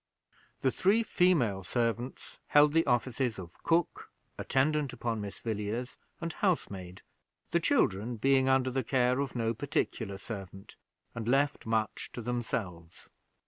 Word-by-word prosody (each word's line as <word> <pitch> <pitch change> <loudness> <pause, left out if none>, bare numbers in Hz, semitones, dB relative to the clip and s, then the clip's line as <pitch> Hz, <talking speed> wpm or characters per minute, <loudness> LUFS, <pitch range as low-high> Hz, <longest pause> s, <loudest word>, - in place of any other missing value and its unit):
The 130 - +2
three 205 - +3
female 135 - +2
servants 120 +4 -2
held 145 0 +5
the 165 -1 +3
offices 120 -1 +1
of 85 -3 -8
cook, 165 0 0 0.3
attendant 145 0 +1
upon 115 -3 -2
Miss 100 -1 -6
Villiers, 110 +3 -3 0.2
and 170 -2 -4
housemaid; 95 - -2 0.5
the - - +3
children 105 +6 +1
being 135 +3 +3
under 130 -1 +3
the 130 +1 -1
care 125 +1 +2
of 140 -2 -2
no 115 -1 0
particular 100 -2 -2
servant, 95 -2 -8 0.4
and 115 -1 -5
left 135 0 +1
much 110 -2 -1
to 120 - -5
themselves. 100 -8 -4
120 Hz, 135 wpm, -31 LUFS, 105-135 Hz, 0.5 s, held